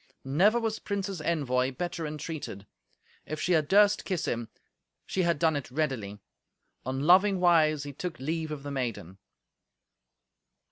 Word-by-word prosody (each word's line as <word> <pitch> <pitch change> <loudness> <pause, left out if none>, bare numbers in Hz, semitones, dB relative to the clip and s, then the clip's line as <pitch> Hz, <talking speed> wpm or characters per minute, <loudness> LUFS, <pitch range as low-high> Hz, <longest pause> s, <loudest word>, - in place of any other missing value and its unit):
Never 190 - +3
was 225 -1 -2
prince's 200 -4 -3
envoy 135 -6 0
better 170 +2 -3
entreated. 150 -9 -6 0.6
If 155 - -4
she 180 - -1
had 155 -4 +3
durst 205 +3 +4
kiss 185 -5 -2
him, 115 -1 -3 0.6
she 190 - -1
had 170 -2 +2
done 160 0 +2
it 145 - -4
readily. 125 -8 -2 0.7
On 130 +1 -2
loving 190 +5 +5
wise 155 -4 +4
he 145 -1 -7
took 175 +4 -5
leave 160 +3 -3
of 150 -2 -6
the 145 - -5
maiden. 115 -9 -4
155 Hz, 145 wpm, -28 LUFS, 135-180 Hz, 0.7 s, loving